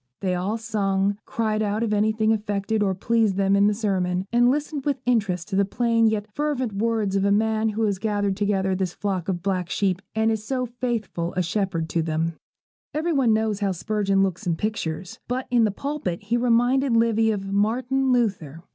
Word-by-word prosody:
They 185 -2 0
all 190 +5 -1
sung, 200 -3 0
cried 215 -2 -1
out 210 +1 0
if 215 -2 0
anything 215 +1 +2
affected 210 0 -1
or 195 -2 +1
pleased 225 0 +1
them 195 0 +2
in 200 +1 +4
the 210 - +3
sermon, 185 -4 -1
and 240 +1 +5
listened 290 +1 -1
with 285 -1 0
interest 200 -8 0
to 195 - -2
the 200 - +4
plain 230 +2 +2
yet 215 -1 0
fervent 280 -6 -1
words 215 -1 0
of 195 - +2
the 200 +1 +2
man 220 +1 +2
who 220 +1 -2
has 200 -3 0
gathered 205 -2 0
together 195 -2 0
this 185 -2 -2
flock 195 -3 -2
of 175 -2 -2
black 185 -3 -1
sheep 190 -2 0
and 220 0 +2
is 220 -1 -2
so 255 +2 -1
faithful 230 -8 -3
a 180 - +2
shepherd 175 -2 -1
to 170 - 0
them. 160 +1 -1 0.6
Every 325 +2 0
one 265 -6 +3
knows 215 -2 +1
how 200 -2 0
Spurgeon 195 +1 +1
looks 190 +1 -2
in 170 - +1
pictures, 180 -3 -4
but 255 +2 -2
in 235 -2 +4
the - - +2
pulpit 205 - -4
he 220 +4 0
reminded 245 +1 +3
Livy 225 -1 +3
of 195 -2 -2
Martin 250 +6 +1
Luther. 185 - -1
210 Hz, 200 wpm, -24 LUFS, 195-230 Hz, 0.6 s, and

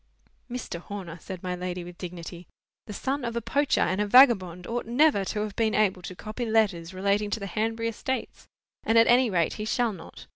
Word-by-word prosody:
"Mr. 240 -8 -5
Horner," 180 -2 -8
said 190 -2 -8
my 180 -1 -2
lady, 180 0 -4
with 175 0 -11
dignity, 175 -1 -8 0.4
"the - - -7
son 270 +6 -2
of 235 -1 -3
a - - +1
poacher 280 +5 +1
and 185 +4 +1
vagabond 195 -8 +5
ought 235 +2 -3
never 250 -3 +3
to 210 - -2
have 210 -1 -4
been 220 -1 +1
able 195 -3 +2
to 180 +1 -8
copy 215 +5 -6
letters 200 -7 +1
relating 200 +2 0
to 220 - -2
the 200 - -5
Hanbury 225 +4 -2
estates; 260 +4 -5 0.4
and, 225 - +2
at 230 - +7
any 245 +1 +4
rate, 170 -5 +1
he 215 - -5
shall 235 0 0
not. 185 - -12
210 Hz, 205 wpm, -27 LUFS, 180-230 Hz, 0.4 s, at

